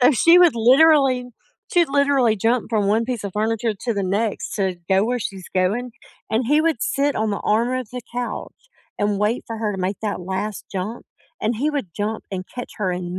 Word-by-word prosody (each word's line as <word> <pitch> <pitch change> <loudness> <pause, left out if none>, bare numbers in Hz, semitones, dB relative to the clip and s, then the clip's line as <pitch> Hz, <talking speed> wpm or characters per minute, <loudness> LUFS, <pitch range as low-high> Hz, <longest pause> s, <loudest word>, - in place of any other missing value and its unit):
So 270 - +7
she 335 +8 +6
would 350 -7 +6
literally 260 +1 +5 0.5
she'd 345 -3 +4
literally 275 -5 +3
jump 230 +3 0
from 210 -3 +1
one 220 +3 +2
piece 240 -4 -4
of 200 - -4
furniture 220 +1 0
to 235 - +1
the 200 -1 -1
next 205 +3 -1
to 190 -3 0
go 190 +2 +3
where 245 +1 0
she's 195 -4 -6
going, 210 +7 0 0.4
and 225 +3 +1
he 300 +3 +4
would 320 -8 +1
sit 280 0 0
on 220 -1 0
the 200 - -2
arm 230 +3 +2
of 255 -4 -4
the 250 - -4
couch 245 0 -4 0.4
and 205 -1 0
wait 210 +4 0
for 225 -1 -5
her 215 -2 -1
to - - -5
make 190 +2 -2
that 205 -3 -2
last 190 +3 -4
jump, 195 +5 -4 0.4
and 220 +1 0
he 290 +6 0
would 285 -10 -3
jump 215 +2 -3
and 185 -1 -3
catch 245 - -6
her 190 -3 0
in 180 0 -4
225 Hz, 215 wpm, -22 LUFS, 200-250 Hz, 0.5 s, So